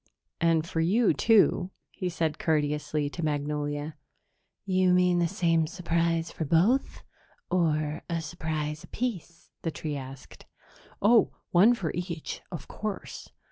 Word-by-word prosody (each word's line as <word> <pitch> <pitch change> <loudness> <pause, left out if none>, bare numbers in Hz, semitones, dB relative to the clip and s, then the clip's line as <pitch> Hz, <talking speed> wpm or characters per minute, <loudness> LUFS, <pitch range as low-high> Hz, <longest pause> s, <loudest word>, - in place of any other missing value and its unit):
And 165 -1 +2
for 165 - -3
you, 205 +8 +3
too," 215 -4 +4 0.2
he 180 - -3
said 165 -1 -2
courteously 150 -4 0
to 170 - -5
Magnolia. 145 0 -2 0.7
"You 185 -1 +3
mean 180 -1 +3
the 170 - +2
same 165 -4 +1
surprise 170 -2 0
for - - -4
both, 180 - +2 0.5
or 155 -3 +1
a 170 -1 0
surprise 155 -1 -4
apiece?" 195 -9 -5
the 165 - -1
tree 155 -1 -4
asked. 135 -1 -10 0.6
"Oh, 225 +1 +5 0.2
one 205 +8 +6
for 175 -9 -3
each, 175 -2 -5
of 170 - -7
course." 210 -2 -6
165 Hz, 130 wpm, -28 LUFS, 155-185 Hz, 0.7 s, one